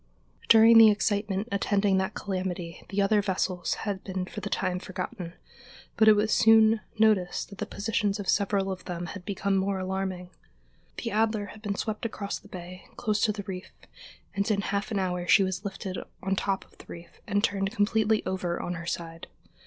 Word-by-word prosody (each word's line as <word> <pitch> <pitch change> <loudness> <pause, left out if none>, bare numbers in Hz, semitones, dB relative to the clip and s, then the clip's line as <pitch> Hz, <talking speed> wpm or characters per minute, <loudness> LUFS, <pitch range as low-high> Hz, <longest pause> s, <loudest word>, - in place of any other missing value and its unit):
] - - -25
During 225 +1 +8
the 225 -1 +9
excitement 205 0 0
attending 200 -1 +2
that 190 +2 -2
calamity 185 -4 -4
the 200 0 +1
other 205 +1 +3
vessels 185 -2 -1
had 200 -3 -3
been 185 -1 -3
for - - -8
the 205 - -4
time 185 -2 -1
forgotten, 180 -1 -6 0.6
but 220 - +4
it 215 - +10
was 210 +1 +1
soon 220 0 +5 0.2
noticed 210 -5 +2
that 200 - -12
the - - -3
positions 205 -1 -1
of 200 - -5
several 195 -1 +1
of 185 - -7
them 175 -1 -4
had 200 -3 -9
become 200 0 -1
more 195 0 0
alarming. 185 -1 -3 0.7
The - - -3
Adler 215 0 +1
had 215 - -14
been 205 -2 -2
swept 215 +1 -3
across 210 -3 -4
the - - -17
bay, 185 -1 -9
close 215 -3 0
to 215 - +3
the 205 -1 -6
reef, 185 -1 -7 0.6
and 200 +2 -1
in 205 -2 +2
half 200 +2 -2
an 215 - -2
hour 180 -2 -1
she 195 - +6
was 185 0 -3
lifted 195 -2 -5 0.2
on 195 0 0
top 195 0 -1
of - - -26
the - - -13
reef 170 0 -12
and 205 -1 +1
turned 195 -1 +1
completely 220 0 +1
over 180 -2 -2
on 175 - -3
her 170 -1 -7
side. 165 -1 -5
195 Hz, 195 wpm, -27 LUFS, 185-210 Hz, 0.7 s, it